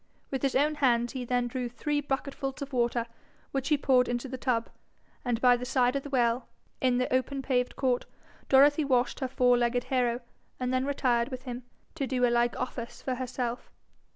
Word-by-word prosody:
With 270 - -2
his 275 -2 0
own 295 +3 +3
hands 240 -2 +3
he 255 -2 -4
then 245 0 +1
drew 245 0 -3
three 290 +4 -1
bucketfuls 270 0 -3
of 280 0 -10
water, 235 -1 +1 0.5
which 270 +1 -2
he 300 - +4
poured 255 -3 +3
into 245 +2 -2
the 260 - -5
tub, 245 -3 0 0.6
and 245 -3 0
by 245 0 +6
the 245 - -5
side 250 0 +2
of 275 - 0
the 285 - -8
well, 240 -2 +1 0.3
in 255 -1 +3
the 255 0 0
open 270 +1 0
paved 250 -2 0
court, 255 -2 0 0.4
Dorothy 290 +3 +6
washed 250 -3 +1
her 265 - -1
four 250 -1 +3
legged 245 +1 +1
hero, 245 -1 +1 0.4
and 255 0 -1
then 255 +1 +1
retired 245 -4 +1
with 255 -2 -6
him, 245 -1 -6 0.3
to 280 -5 -2
do 255 -1 +2
a 240 - +2
like 240 0 +2
office 245 -2 -5
for 260 - -1
herself. 250 -1 -4
255 Hz, 200 wpm, -29 LUFS, 245-270 Hz, 0.6 s, by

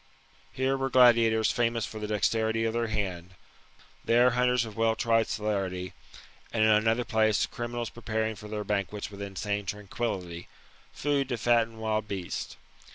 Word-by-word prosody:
Here 130 +1 0
were 135 0 -1
gladiators 115 -3 +5
famous 115 -2 0
for 110 - -8
the 105 - -4
dexterity 110 +1 +1
of 110 - 0
their 115 0 0
hand; 90 -5 -4 0.7
there 120 +2 +4
hunters 125 0 +2
of 110 -2 -9
well 115 0 +2
tried 115 -1 +2
celerity; 95 -4 -2 0.6
and 110 - +1
in 110 - +5
another 115 +3 +3
place, 110 -3 +2
criminals 120 -1 -5
preparing 110 -2 -2
for 105 +1 -10
their 105 0 -4
banquets 100 0 -3
with 100 0 -9
insane 100 +1 -3
tranquility, 100 -4 -4 0.4
food 140 -2 -1
to 120 - -1
fatten 115 0 +2
wild 110 -1 -1
beasts. 95 -4 -5
110 Hz, 155 wpm, -28 LUFS, 105-120 Hz, 0.7 s, gladiators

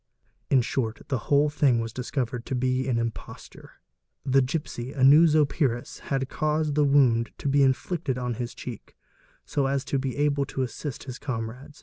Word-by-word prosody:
In 130 -3 +4
short, 115 -2 -2
the 130 - 0
whole 145 +1 +4
thing 140 -5 +3
was 115 -1 -4
discovered 125 -2 -3
to 130 - -2
be 130 +1 0
an 125 -3 +1
imposture. 115 -1 -6 0.5
The 135 0 +4
gipsy, 130 -2 -4
a 135 - -1
new 150 +5 +8
Zopyrus, 145 -5 +1
had 135 -1 -2
saused 155 +1 0
the 150 +1 +3
wound 130 -5 +3
to - - -5
be 140 +1 +3
inflicted 135 +1 0
on 125 -1 -2
his 120 - -5
cheek, 120 -5 -9 0.5
so 140 -2 0
as 135 0 -1
to 140 - -1
be 130 0 -3
able 145 -1 +1
to 130 - -3
assist 130 +2 -5
his 130 -2 -8
comrades. 125 +3 -6
135 Hz, 180 wpm, -26 LUFS, 125-145 Hz, 0.5 s, new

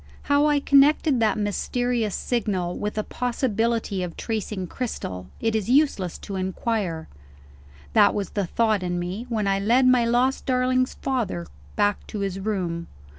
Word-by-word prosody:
How 285 +1 +3
I 295 -1 +3
connected 280 0 +4
that 220 -1 +2
mysterious 225 +1 -1
signal 195 -7 -1
with 210 +1 -4
a 215 - 0
possibility 230 -5 -1
of 175 -2 -5
tracing 210 -4 -3
Cristel, 95 - -5
it 225 -1 0
is 215 0 -1
useless 255 - +2
to 195 - -4
inquire. 190 -3 -2 0.9
That 205 - +5
was 200 -3 -3
the 200 -3 -1
thought 220 0 +1
in 175 -1 -2
me, 185 +7 -4
when 220 -3 -1
I 195 0 +2
led 235 +6 +3
my 255 -1 +5
lost 245 +3 +1
darling's 255 0 +1
father 230 - -2 0.3
back 205 0 +1
to 210 - -5
his 195 -1 -2
room. 180 -5 -2
215 Hz, 155 wpm, -24 LUFS, 190-250 Hz, 0.9 s, That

